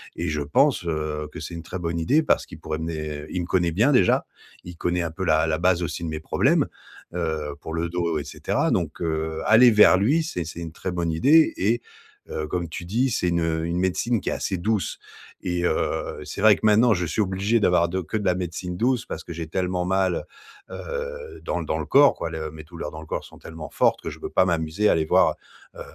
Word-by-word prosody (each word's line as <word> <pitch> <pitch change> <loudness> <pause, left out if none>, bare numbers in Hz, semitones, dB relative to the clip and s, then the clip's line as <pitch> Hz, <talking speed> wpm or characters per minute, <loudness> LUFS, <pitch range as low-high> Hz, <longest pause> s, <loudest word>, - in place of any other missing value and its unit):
et - - -2
je 75 -1 -1
pense, 75 +4 +2
heu, 75 -2 -2
que - - -8
c'est 85 - -6
une 85 - -7
très 90 +1 -6
bonne 85 -1 -2
idée 145 - +3
parce - - +2
qu'il - - -12
pourrait 80 0 -4
mener. 75 -2 -4
Il 90 - -2
me 85 - -5
connaît 85 -2 +1
bien 115 - +3
déjà, 95 -9 +3 0.4
il 90 -1 -10
connaît 90 +1 0
un 85 -2 -3
peu 95 +3 -4
la 80 -1 +3
la 80 0 +1
base 90 0 +2
aussi 85 +1 -4
de 85 - -2
mes 80 0 -4
problèmes, - - +2 0.5
heu, 80 -4 -2
pour 80 - -6
le 85 +1 -1
dos, 85 -2 -1
et - - -4
cetera. - - -1
Donc 85 -3 -1
heu, 80 -1 -2
aller 115 +2 +7
vers 105 -3 +7
lui, 145 - +2
c'est 90 - -4
c'est 85 +1 -7
une 80 -1 -6
très 90 +2 -5
bonne 85 -2 -1
idée. 145 - +5
Et 115 +5 +1 0.5
heu, 75 0 -3
comme 85 0 -3
tu 85 - -6
dis, 120 +8 +1
c'est 90 - 0
une, 85 -1 +1
heu, 80 0 -1
une 85 +1 -1
médecine 95 +4 0
qui - - -2
est - - -1
assez 95 - -2
douce. 105 +2 -1 0.4
Et 90 -1 -1
heu, 80 - -1
c'est 75 - -7
vrai 110 -1 +7
que - - -13
maintenant 110 +2 +5
je 90 -2 -1
suis 105 - -1
obligé 100 +4 +1
d'avoir 90 -3 +3
de 95 +2 -1
que 90 - -6
de 105 - -3
la 90 - +4
médecine 90 0 -4
douce 125 +3 +1
parce 80 - -6
que 85 - -7
j'ai 80 -1 -5
tellement 90 +1 -1
mal, 95 -1 +1 0.5
heu, 480 -2 -6
dans 90 - -2
dans 80 0 -2
le 75 - -3
corps, 140 - +6
quoi. 85 - -4 0.2
Mes 80 0 -10
douleurs 80 -1 -7
dans 80 - -8
le 80 - -10
corps - - -4
sont - - -15
tellement 80 -2 -9
fortes - - +2
que - - -4
je - - -10
peux - - -5
pas 95 - +3
m'amuser 85 +4 0
à - - +5
aller 80 - +1
voir, - - +4 0.4
heu, - - -9
85 Hz, 245 wpm, -24 LUFS, 80-100 Hz, 0.5 s, aller